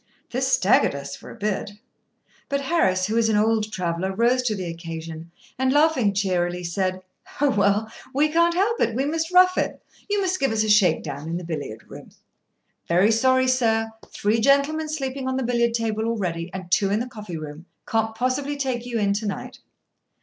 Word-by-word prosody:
This - - 0
staggered - - +3
us 140 0 -6
for - - -13
a - - -10
bit. 205 -1 -2 0.8
But 280 0 0
Harris, 265 - +1
who 215 +3 -1
is 225 -1 +3
an 215 - +2
old 215 0 +1
traveller, 185 -1 -2
rose 240 +3 +3
to 235 -4 -1
the 185 -2 -4
occasion, 165 -1 -7 0.3
and, 260 0 +2
laughing 290 -7 +3
cheerily, 180 -2 0
said: 185 +2 -2 0.4
"Oh, 285 -1 +3
well, 205 0 +1 0.2
we 290 +3 +3
can't 340 +2 +3
help 425 +5 +1
it. 225 -1 +1
We 265 +3 0
must 325 +3 -2
rough 365 0 +5
it. - - -2 0.3
You 410 0 +1
must 370 -1 0
give 270 -3 +1
us 220 -1 +1
a 215 - -2
shake 200 -6 +4
down 145 +3 -6
in 170 - -2
the 180 - -6
billiard 145 -9 -5
room." - - -11 0.8
"Very 180 +6 +4
sorry, 260 +3 +3
sir. 225 -3 +1 0.2
Three 215 +2 0
gentlemen 280 +4 +2
sleeping 270 -3 -3
on 260 0 -1
the 265 - -1
billiard 235 -1 +1
table 220 -1 -1
already, 180 -7 -2
and 185 -2 -8
two 195 +1 +3
in 205 +2 +1
the 240 - -2
coffee 210 -8 -8
room. 155 +2 -9 0.2
Can't 225 0 0
possibly 270 +4 -1
take 255 -3 -2
you 240 -1 -2
in 200 -2 +2
to 210 +1 -2
night." 200 - -6
220 Hz, 195 wpm, -23 LUFS, 185-260 Hz, 0.8 s, rough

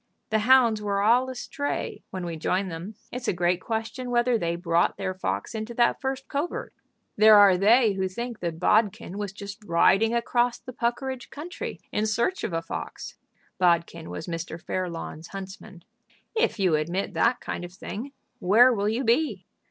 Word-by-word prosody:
The 220 - +3
hounds 230 -1 +5
were 200 -1 0
all 245 +4 +4
astray 285 +3 -4
when 185 -2 -5
we 170 -1 -4
joined 185 +4 -1
them. 175 +6 -7 0.2
It's 250 -1 -5
a - - +2
great 175 +1 +1
question 225 +3 -4
whether 240 0 +2
they 170 -6 0
brought 170 -1 +1
their 190 -1 -2
fox 100 - -3
into 220 +1 -5
that 240 0 +2
first 265 0 -3
covert. 290 +5 -3 0.4
There 215 +1 +8
are 200 -2 +7
they 215 +4 +4
who 190 -1 -1
think 235 +4 -5
that 170 -2 -4
Bodkin 210 0 +1
was 205 -2 -3
just 200 +1 -9
riding 195 +5 +3
across 240 +1 +1
the 255 - -10
Puckeridge 250 +2 -2
country 340 +6 -6
in 215 +1 0
search 235 - 0
of - - -2
a 165 0 -2
fox." 165 - -7 0.4
Bodkin 170 -2 +1
was - - -6
Mr. 165 -1 -5
Fairlawn's 170 -2 -5
huntsman. 195 -1 -9 0.5
"If 455 - +1
you 185 -5 +2
admit 170 +6 -1
that 240 +2 +2
kind - - -5
of 175 - -7
thing, 220 +8 -7 0.3
where 235 +7 +6
will 205 -1 0
you 230 +5 -1
be? 245 +7 +1
210 Hz, 175 wpm, -26 LUFS, 180-240 Hz, 0.5 s, There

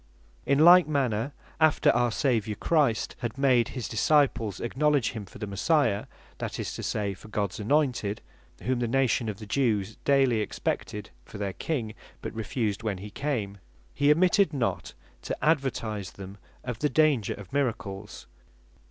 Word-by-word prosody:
In 140 - +3
like 175 +2 +8
manner, 135 -4 0 0.3
after 155 -2 +4
our 120 +1 +2
Saviour 110 -4 0
Christ 145 -7 +1
had 120 0 -4
made 130 -4 +3
his 125 -5 -5
Disciples 115 - +2
acknowledge 140 +1 +1
him 105 -4 -7
for - - -13
the 105 - -4
Messiah, 105 - +1 0.3
(that - - -4
is - - -3
to - - -6
say, 100 -2 -2
for 95 - -14
Gods 105 -2 -2
anointed, 115 -3 +1 0.4
whom 130 -1 0
the 120 - 0
nation 125 -2 +1
of 105 - -5
the 110 - -9
Jews 110 -3 0
daily 135 -5 +3
expected 105 0 -3
for - - -11
their 100 -2 -3
King, 115 - -3 0.3
but - - -6
refused 110 -2 -2
when 110 -4 -2
he 100 +3 -9
came,) 105 -8 -3 0.3
he 145 +1 +3
omitted 180 +2 +4
not 130 -5 -2 0.3
to - - -4
advertise 115 - 0
them 100 +1 -10 0.2
of 125 -2 -5
the 150 - +1
danger 140 -6 +2
of 105 +1 -12
miracles. 105 -7 -3
120 Hz, 160 wpm, -27 LUFS, 105-140 Hz, 0.4 s, like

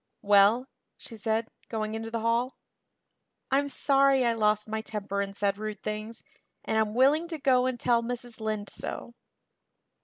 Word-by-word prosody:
"Well?" 205 +5 +5 0.3
she 230 - -10
said, 220 +1 -1 0.2
going 215 -1 -3
into 225 0 -4
the 230 0 -3
hall. 235 +3 0 0.9
"I'm 285 +1 +2
sorry 275 -2 +3
I 235 - +3
lost 210 -1 +1
my 220 0 -3
temper 205 -2 -3
and 200 0 -5
said 200 0 0
rude 215 -1 -5
things, 215 +2 -5 0.4
and 220 - +1
I'm 215 0 0
willing 290 +6 +4
to 330 -2 -5
go 255 -3 +3
and 255 -2 -3
tell 235 0 +3
Mrs. 240 -1 -5
Lynde 215 -2 -3
so." 235 - -6
225 Hz, 160 wpm, -28 LUFS, 215-250 Hz, 0.9 s, Well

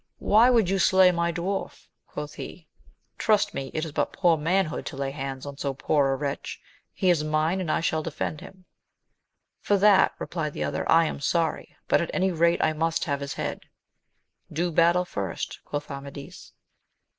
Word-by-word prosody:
Why 225 +4 +5
would 230 -6 +4
you 195 +1 +1
slay 185 0 +5
my 170 -1 0
dwarf? 180 +4 -4 0.2
quoth - - -6
he; - - -9 0.5
trust 210 -2 +2
me 135 -1 -4
it 155 +1 -2
is 160 - -6
but - - -1
poor 175 -3 +3
manhood 165 +2 0
to - - -6
lay 135 0 -2
hands 135 -1 -5
on 140 -1 -7
so 140 -1 -2
poor 140 0 +1
a - - +1
wretch: 140 0 -4 0.3
he 185 -2 +2
is 160 -3 +1
mine, 155 +4 0
and 175 - -4
I - - +1
shall 160 -1 0
defend 155 0 -4
him. 185 0 -13 0.9
For 205 - +1
that, 200 -1 +5
replied 155 -4 -4
the - - -3
other, - - -2
I 165 0 +6
am 155 - -4
sorry; 165 +3 -1
but - - +3
at 170 - -3
any 190 0 +2
rate 170 0 +2
I 155 - +2
must 165 +1 -1
have 140 -2 -1
his 140 0 -5
head. - - -4 0.9
Do 175 +3 -1
battle 170 +2 +3
first, 100 - -5
quoth 145 0 -5
Amadis. 140 0 -9
165 Hz, 185 wpm, -26 LUFS, 145-180 Hz, 0.9 s, I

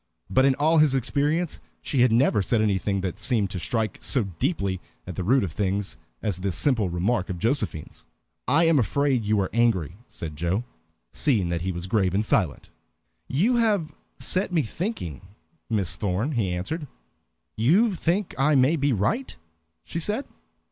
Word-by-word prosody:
But 130 +1 +4
in 135 -1 +4
all 155 +3 +3
his 150 -3 +4
experience 150 +6 0 0.2
she 135 - 0
had 125 -1 +5
never 115 -2 +3
said 110 +5 +1
anything 100 -2 0
that 95 -2 -4
seemed 110 -7 +1
to 90 - -4
strike 110 +2 -2
so 95 +9 +2 0.2
deeply 100 - -1 0.2
at 90 - -7
the 95 - -3
root 125 +7 +3
of 90 - -3
things 100 +1 -1 0.3
as 95 -4 -1
this 95 -2 -2
simple 115 -9 +2
remark 95 +4 0
of 90 - -3
Josephine's. 110 - -2 0.4
"I 145 +7 +4
am 165 -3 +4
afraid 130 +2 +1
you 105 0 +1
are 95 - -2
angry," 100 -8 +1
said 80 -2 -7
Joe, 85 +8 -1 0.5
seeing 110 - +1
that 85 -1 -1
he 95 +2 -1
was 85 0 -5
grave 95 -2 +1
and 105 +2 +1
silent. 90 -8 0 0.6
"You 215 - +2
have 210 -9 +1 0.2
set 185 +1 -1
me 165 -4 +2
thinking, 135 - -4 0.5
Miss 100 -7 0
Thorn," 105 +8 -1
he 115 -9 0
answered. 145 - -3 0.7
"You 185 - +3
think 180 +3 -1
I 150 +2 +4
may 135 +5 +4
be 140 -1 +1
right?" 120 - -1 0.5
she 170 - -4
said. 210 - -1
115 Hz, 170 wpm, -25 LUFS, 95-150 Hz, 0.7 s, had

